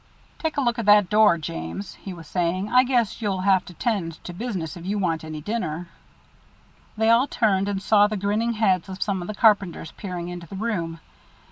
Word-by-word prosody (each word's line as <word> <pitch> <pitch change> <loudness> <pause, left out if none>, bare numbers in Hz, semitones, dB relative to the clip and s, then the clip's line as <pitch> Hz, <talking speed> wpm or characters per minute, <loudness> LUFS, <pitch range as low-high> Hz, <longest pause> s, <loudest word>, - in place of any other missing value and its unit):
"Take 320 -2 -2
a - - +2
look 240 -2 0
at 225 - -3
that 205 -3 +6
door, 210 -5 +5
James," 85 - -6
he 195 - -9
was 170 -3 -9
saying. 180 +4 -1
"I 250 0 +7
guess 240 -4 0
you'll 195 -4 -1
have 190 -1 +3
to 180 - -12
tend 190 -5 -1
to 175 - -7
business 185 -6 -4
if 170 - -9
you 200 +3 -2
want 165 -5 -1
any 155 -1 -6
dinner." 175 -4 -3 1.1
They 220 +1 +4
all 240 +4 +4
turned 200 -7 +1
and 200 -1 -1
saw 205 +1 +4
the 210 0 -3
grinning 210 +4 0
heads 195 -5 +1
of 190 0 -7
some 195 -3 -2
of 175 - -6
the 215 - -5
carpenters 200 -7 +2
peering 180 -3 -6
into 175 -1 -7
the 195 - -9
room. 185 -6 -3
195 Hz, 210 wpm, -24 LUFS, 175-220 Hz, 1.1 s, I